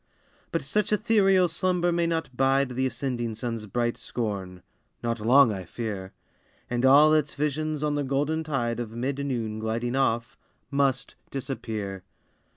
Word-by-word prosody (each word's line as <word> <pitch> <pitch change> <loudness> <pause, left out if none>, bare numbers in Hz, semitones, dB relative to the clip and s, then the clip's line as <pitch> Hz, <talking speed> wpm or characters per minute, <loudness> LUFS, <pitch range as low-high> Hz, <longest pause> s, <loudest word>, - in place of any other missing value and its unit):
But - - -1
such 210 0 0
ethereal 200 -4 +4
slumber 175 +1 +1
may 170 0 +1
not 165 -6 -2
bide 135 +1 +3
The 130 +1 0
ascending 120 -2 -3
sun's 115 -2 -4
bright 120 +3 -1
scorn 95 -6 -4 0.4
not 115 -1 -1
long, 120 +3 +6
I 95 -2 -5
fear; 95 0 -5 0.6
And 120 0 0
all 145 +4 +7
its 150 -1 +1
visions 150 +1 -1
on 150 -1 +1
the 145 0 0
golden 145 +4 0
tide 120 -6 -1
Of 120 -2 -3
mid 135 +4 -2
noon 115 -6 -2
gliding 115 +3 -2
off, 120 -1 0 0.3
must 140 -2 0
disappear. 110 -8 -4
130 Hz, 150 wpm, -26 LUFS, 115-150 Hz, 0.6 s, all